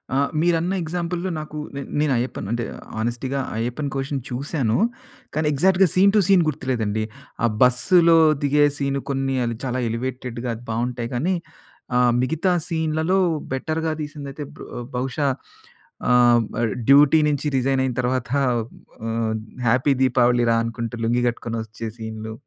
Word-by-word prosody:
ఆ - - +3 0.2
మీరన్న 170 +2 +1
ఎగ్జాంపుల్‌లో 175 +2 -3
నాకు 155 0 -7 0.2
నే 140 - -3 0.2
నేను 150 -2 +2
అయ్యప్పన్ 120 -4 -3
అంటే 120 0 -1 0.3
హానెస్టీగా 120 +4 -2 0.2
'అయ్యప్పన్ 125 +6 -2
కోషియుమ్' 135 0 -2
చూసాను. 125 -2 -1 0.6
కానీ, 155 0 0
ఎగ్జాక్ట్‌గా 190 +6 +4
సీన్ 195 +2 +5
టు - - +6
సీన్ 190 -3 +5
గుర్తులేదండి. 115 -7 -1 0.4
ఆ - - +5 0.2
బస్సులో 165 +7 +5 0.3
దిగే 145 +1 +4
సీన్ 140 -1 -1
కొన్ని 135 -1 0 0.3
చాలా 130 0 -1
ఎలివేటెడ్‌గా 125 +1 -4
అది 115 - -12
బావుంటాయి 120 +1 -2
కానీ 170 +10 +1 0.6
ఆహ్, 125 -1 +4
మిగతా 160 +8 +1 0.2
సీన్‌లలో 160 +2 0 0.3
బెటర్‌గా 160 +4 -1
తీసిందయితే 145 -1 -6
బ - - -17 0.4
బహుశా 130 +3 -1 0.8
ఆహ్, 120 -1 +5 0.2
ఆ - - +1 0.3
డ్యూటీ 145 +3 +7
నుంచి 150 0 0
రిజైనైన 130 0 +1
తరువాత 125 0 -1
ఆహ్, 125 -4 +1 1.1
"హ్యాపీ 130 +4 +3
దీపావళి 125 -1 +3
రా" 115 - +4
అనుకుంటూ 115 0 -4
లుంగి 120 +2 +1
కట్టుకొనోచ్చే 115 -1 -4
సీన్లు. 110 -1 -6
130 Hz, 130 wpm, -22 LUFS, 120-155 Hz, 1.1 s, డ్యూటీ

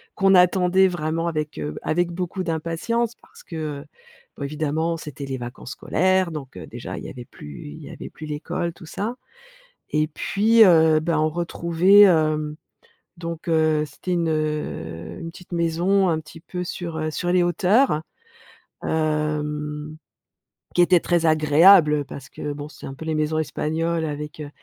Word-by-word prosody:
qu'on 195 -1 +4
attendait 180 +1 +5
vraiment 165 0 -2
avec, 155 -2 -3
heu, 75 0 -4
avec 175 +1 0
beaucoup 185 +1 -3
d'impatience, 170 +9 -1
parce - - -17
que, 155 -4 -5
heu, - - -14 0.6
évidemment, 155 +3 -1
c'était 150 -3 -7
les 135 -1 -4
vacances 125 +2 -8
scolaires, 185 0 +1
donc, 140 -4 -7
heu, - - -8
déjà, - - -7
il - - -9
y - - -6
avait 120 -1 -9
plus 75 - -11
il 75 - -9
y - - -9
avait - - -8
plus 155 - -10
l'école, 155 +3 -3
tout 170 - -13
ça 220 +8 -3 0.8
e - - +2
t 155 - +2
puis, 220 +3 +4
heu, 160 -3 +5
ben, 165 -1 0
on 155 - +3
retrouvait, 170 +4 +3
hem, 155 -5 +4 0.6
donc 170 0 -6
heu, 155 -2 +3
c'était 150 +5 -6
une, 170 -2 +1
heu, 90 - -3
une 165 - -6
petite 180 +1 -15
maison 175 +3 +2
un 160 -1 0
petit 155 +1 -13
peu 180 +1 -5
sur, 170 -2 -5
heu, 155 0 -1
sur 175 +2 -2
les 180 -1 +4
hauteurs, 180 - +3 0.8
hem, 150 -1 -2 0.8
qui 175 - +5
était 175 0 +5
très 170 -1 +1
agréable, 155 +2 +6
heu, 145 - +1
parce 135 -1 -10
que, 145 - -5
bon, 145 +1 -7
c'est - - -12
un 135 - -6
peu 160 - -9
les 160 -1 -1
maisons 155 +1 0
Espagnoles 160 +2 -1
avec, 150 0 -5
heu, 145 - -6
160 Hz, 175 wpm, -23 LUFS, 150-175 Hz, 0.8 s, agréable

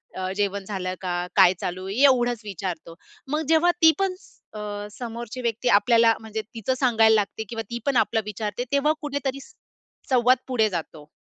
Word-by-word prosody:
अ, 185 0 -3
जेवण 200 -1 -1
झालं 185 -3 -3
का? 180 -1 -2 0.2
काय 185 -2 +7
चालू 185 +1 -4
आहे? 195 - -4
एवढंच 245 -4 +3
विचारतो. 180 -4 -6 0.4
मग 305 - 0
जेव्हा 325 +2 +4
ती 320 - +8
पण 385 -2 0
स - - -22 0.2
अ, 205 -1 -6
समोरची 235 +2 -7
व्यक्ती 235 +1 -1
आपल्याला, 230 +2 +5
म्हणजे 220 0 -5
तिचं 225 +3 -3
सांगायला 225 -4 +4
लागते, 210 +1 -1
किंवा 225 -1 -4
ती 235 - -4
पण 280 -2 +1
आपलं 225 - +2
विचारते 210 +2 -4
तेव्हा 280 +2 +2
कुठेतरी 280 -2 -3
स - - -16 0.6
संवाद 250 0 +4
पुढे 230 -4 +2
जातो. 160 -4 -6
225 Hz, 175 wpm, -24 LUFS, 200-255 Hz, 0.6 s, ती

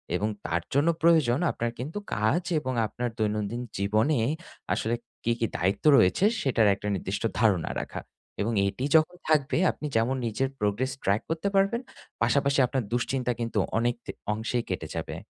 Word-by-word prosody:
এবং 105 +4 0 0.2
তার 85 +1 0
জন্য 145 +4 +3
প্রয়োজন 155 -7 +4
আপনার 120 0 -2
কিন্তু 150 +10 -5 0.2
কাজ 110 +11 +2 0.2
এবং 130 -2 -3
আপনার 120 +2 -3
দৈনন্দিন 105 +2 -1 0.2
জীবনে 110 +8 +2 0.5
আসলে 115 +2 0 0.3
কি, 120 - +1
কি 115 - +2
দায়িত্ব 95 - -1
রয়েছে? 95 - +4 0.2
সেটার 115 -5 +3
একটা 105 - -6
নির্দিষ্ট 95 +4 -3 0.2
ধারণা 100 -7 +2
রাখা - - -6 0.4
এবং 115 +3 0
এটি 105 +7 -3
যখন 160 +3 +4
থাকবে 150 -2 +2
আপনি 150 - -8
যেমন 115 +4 +2
নিজের 130 +4 -1
progress 105 +6 0
track 100 +3 +2
করতে 165 +4 -1
পারবেন 195 +5 +3 0.4
পাশাপাশি 140 +3 +2
আপনার 130 0 -1
দুশ্চিন্তা 125 +1 0
কিন্তু 115 -2 -1 0.2
অনেক 120 +1 +1
দে - - -4 0.2
অংশেই 115 +2 -2
কেটে - - -3
যাবে। - - -4
120 Hz, 160 wpm, -27 LUFS, 105-140 Hz, 0.5 s, প্রয়োজন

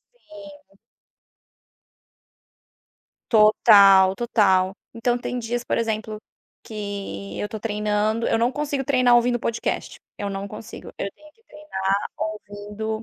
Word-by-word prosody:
Sim. 300 - -15 2.6
Total, 200 -3 +6
total. 195 -6 +2 0.2
Então 240 +1 0
tem 245 0 -4
dias, 240 +1 -3
por - - -1
exemplo, 220 -1 -2 0.5
que 200 -2 -6
eu 205 - -3
tô 220 - -6
treinando. 210 +1 -1
Eu 225 - +1
não 235 +2 +1
consigo 285 -1 -3
treinar 250 -3 +4
ouvindo 240 0 +3
podcast, 230 0 -3 0.2
eu 205 - -4
não 195 0 -5
consigo. 215 +3 -10
Eu 200 - -4
tenho 305 0 -19
que 450 - -33
treinar 300 - -8 0.3
ouvindo 215 +1 -5
220 Hz, 120 wpm, -23 LUFS, 205-245 Hz, 2.6 s, Total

